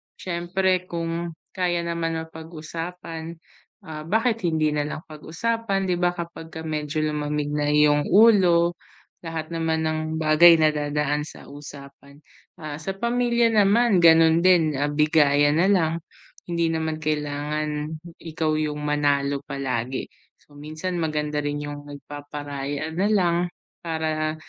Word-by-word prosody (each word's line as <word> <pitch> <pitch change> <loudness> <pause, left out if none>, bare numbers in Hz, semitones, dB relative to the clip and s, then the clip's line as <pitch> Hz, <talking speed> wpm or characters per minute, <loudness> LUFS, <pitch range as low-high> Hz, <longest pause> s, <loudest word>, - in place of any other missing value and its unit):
siyempre 185 +1 -1
kung 170 0 -4 0.2
kaya 175 -2 -1
naman 170 -1 -2
mapag-usapan, 165 +1 -7 0.5
ah, 155 -3 -8
bakit 220 0 +1
hindi 155 -2 +1
nalang 150 +1 -3
pag-usapan, 195 +6 -2
'di 180 -2 -1
ba, 175 0 +1
kapagka 165 -2 -7
medyo 155 -1 -2
lumamig 150 -1 -2
na 150 0 0
yung 150 0 +3
ulo. 180 -5 +5 0.4
Lahat 165 -1 -5
naman 160 -1 0
ng 155 0 0 0.2
bagay 160 +2 +7
nadadaan 150 -1 +1
sa - - -12
usapan. 140 0 -12 0.3
Ah, 155 -2 -7
sa 190 +5 -4
pamilya 235 +1 +1
naman, 210 0 +4
ganun 165 -1 +6
din, 170 -3 +4
ah, 145 - +1
bigayan 145 0 +3
nalang 170 -3 +2 0.5
hindi 170 -1 +1
naman 160 -1 -2
kailangan 150 0 -3 0.2
ikaw 155 -1 -2
yung 150 -1 -2
manalo 145 -1 +1
palagi. 130 -2 -3 0.3
So, 145 -1 -19
minsan 155 +5 -5
maganda 150 -2 -2
rin 145 0 -2
yung 145 0 -7
nagpaparaya 145 0 -6
nalang 180 -1 +1 0.4
para 155 -1 -1
160 Hz, 120 wpm, -24 LUFS, 150-170 Hz, 0.5 s, bagay